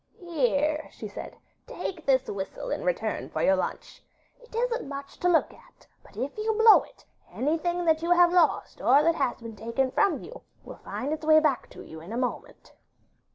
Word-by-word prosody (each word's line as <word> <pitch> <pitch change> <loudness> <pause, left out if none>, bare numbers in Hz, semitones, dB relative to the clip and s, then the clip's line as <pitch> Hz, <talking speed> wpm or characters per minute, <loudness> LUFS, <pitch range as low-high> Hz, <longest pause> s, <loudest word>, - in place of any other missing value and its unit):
'Here,' 300 -2 0
she - - -8
said; - - -9 0.3
'take 360 - -6
this 265 -1 +3
whistle 200 - -5
in - - -2
return - - -2
for - - -2
your 190 - +4
lunch. 185 - -5 0.4
It 485 -2 -15
isn't 475 - -1
much 280 0 -8
to 360 - +2
look 335 - +2
at, - - -21 0.2
but - - -19
if 260 +5 -3
you 440 +1 0
blow 445 0 +7
it, - - -18 0.3
anything 345 +5 -1
that 320 -1 +3
you 335 - -2
have 355 0 +5
lost 345 -4 +2
or 275 +4 +5
that 335 +1 +4
has 270 -6 -1
been 230 -1 -8
taken 230 +5 -1
from 335 -5 +1
you - - -10 0.2
will - - -10
find 285 +4 -3
its 315 - -5
way 310 0 +6
back 300 -5 0
to - - -11
you 160 - -11
in 170 +6 -10
a 230 - -3
moment. 250 0 -5
310 Hz, 200 wpm, -27 LUFS, 260-355 Hz, 0.4 s, blow